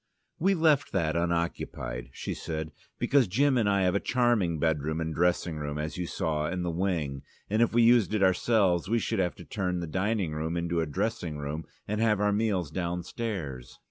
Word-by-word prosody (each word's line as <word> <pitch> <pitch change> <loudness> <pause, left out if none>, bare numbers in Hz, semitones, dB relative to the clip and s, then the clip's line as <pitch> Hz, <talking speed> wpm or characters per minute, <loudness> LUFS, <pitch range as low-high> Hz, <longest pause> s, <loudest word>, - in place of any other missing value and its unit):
"We 195 +4 +3
left 155 -4 +3
that 80 -4 +1
unoccupied," 85 -8 -2
she - - -5
said, 80 -1 -4 0.3
"because 135 -5 +3
Jim 135 +8 +2
and 110 -4 +2
I 100 -1 +2
have 90 -1 +2
a 100 - +2
charming 120 -10 +1
bedroom 80 0 0
and 80 -1 -2
dressing 85 0 +1
room, 75 0 -4
as 75 0 -3
you 90 -1 -3
saw, 75 -2 -1
in 90 0 -2
the 85 - -1
wing, 80 -6 -1 0.3
and 110 +2 +2
if 115 - +4
we 120 0 +4
used 115 -3 +5
it 100 - +2
ourselves 95 -1 +3
we 115 - +3
should 115 -2 -1
have 90 -2 0
to - - -11
turn 90 -4 -2
the 85 - -3
dining 95 +1 -1
room 80 +2 -2
into 85 0 0
a 80 - -1
dressing 80 0 -2
room 75 +2 -4 0.2
and 105 +1 -1
have 110 -3 +3
our 105 0 +2
meals 100 -7 0
downstairs. 85 - -4
90 Hz, 200 wpm, -28 LUFS, 80-105 Hz, 0.3 s, used